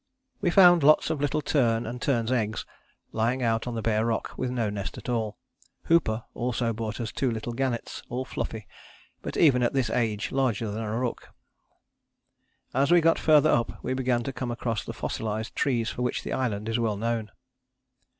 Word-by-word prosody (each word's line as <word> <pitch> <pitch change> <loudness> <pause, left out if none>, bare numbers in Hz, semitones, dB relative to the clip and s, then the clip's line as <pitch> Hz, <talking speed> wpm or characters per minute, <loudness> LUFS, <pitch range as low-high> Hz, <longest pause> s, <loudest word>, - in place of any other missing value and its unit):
"We 180 - +2
found 175 -2 +7
lots 155 +2 +5
of 155 -3 -2
little 145 +1 0
tern 120 -5 +2
and 120 +2 -6
terns' 120 -4 0
eggs, 110 -4 -1 0.5
lying 120 +4 0
out 115 0 0
on 120 - -3
the 115 - -3
bare 110 0 +1
rock 115 -1 -1
with 130 - -2
no 115 -4 -1
nest 100 -1 -5
at - - -7
all. 110 -3 -1 0.5
Hooper 120 -10 +2
also 120 -1 -1
brought 110 -1 -4
us 115 -3 -3
two 135 - 0
little 115 +1 -4
gannets 125 -1 -2
all 125 +2 -3
fluffy, 110 -5 -5 0.6
but - - -5
even 135 -6 +5
at 120 - +1
this 130 -5 0
age 110 -3 -1
larger 120 -5 0
than 110 +2 -4
a 110 0 -2
rook. 125 -1 -3 1.4
As 140 +2 +2
we 175 - +7
got 165 0 +3
further 155 -1 +5
up 120 - 0
we - - -1
began 125 -2 0
to 135 - -4
come 130 -1 -4
across 115 -3 -2
the - - -6
fossilized 110 0 -3
trees 120 -5 0
for - - -6
which 125 - -1
the - - -4
island 110 -5 -1
is 115 +1 0
well 110 -3 0
known. 115 0 -2
120 Hz, 190 wpm, -27 LUFS, 110-130 Hz, 1.4 s, found